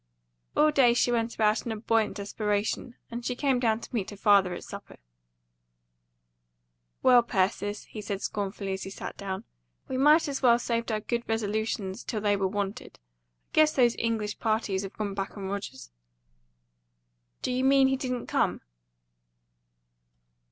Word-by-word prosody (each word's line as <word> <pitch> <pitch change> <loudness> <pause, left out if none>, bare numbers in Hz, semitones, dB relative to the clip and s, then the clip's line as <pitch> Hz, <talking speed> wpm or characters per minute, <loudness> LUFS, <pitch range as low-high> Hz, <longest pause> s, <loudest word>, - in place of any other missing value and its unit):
All 305 0 +5
day 250 -5 +5
she 245 - +2
went 230 -1 0
about 215 0 +2
in 235 - -4
a - - -2
buoyant 225 0 +1
desperation, 210 +3 -2 0.2
and 235 +1 -5
she 250 - -2
came 265 -1 +1
down 225 -2 +1
to - - -11
meet 210 -6 -1
her 205 - -9
father 200 -2 +4
at - - -8
supper. - - -10 2.1
"Well, 250 -1 +7
Persis," 205 -2 -1
he 215 - -8
said 200 -1 -4
scornfully, 200 -1 -3
as 190 - -4
he - - -5
sat 195 - -7
down, 190 -1 -5 0.4
"we 260 - -3
might 300 +4 +5
as 275 -2 -3
well 235 -2 +6
saved 235 -1 -2
our 215 -1 -1
good 235 +2 -1
resolutions 215 -3 -2
till 220 - -3
they 205 -1 +2
were 195 -1 0
wanted. 200 +1 -4 0.5
I - - -40
guess 310 0 +5
those 240 -3 +3
English 220 -2 -1
parties 215 -4 0
have 195 0 -7
gone 205 -2 -3
back 195 +1 -4
on 195 -1 -5
Rogers." 195 - -6 1.5
"Do - - 0
you 255 +1 0
mean 270 0 +5
he 265 - +2
didn't 250 -2 -3
come?" - - 0
220 Hz, 165 wpm, -28 LUFS, 200-245 Hz, 2.1 s, Well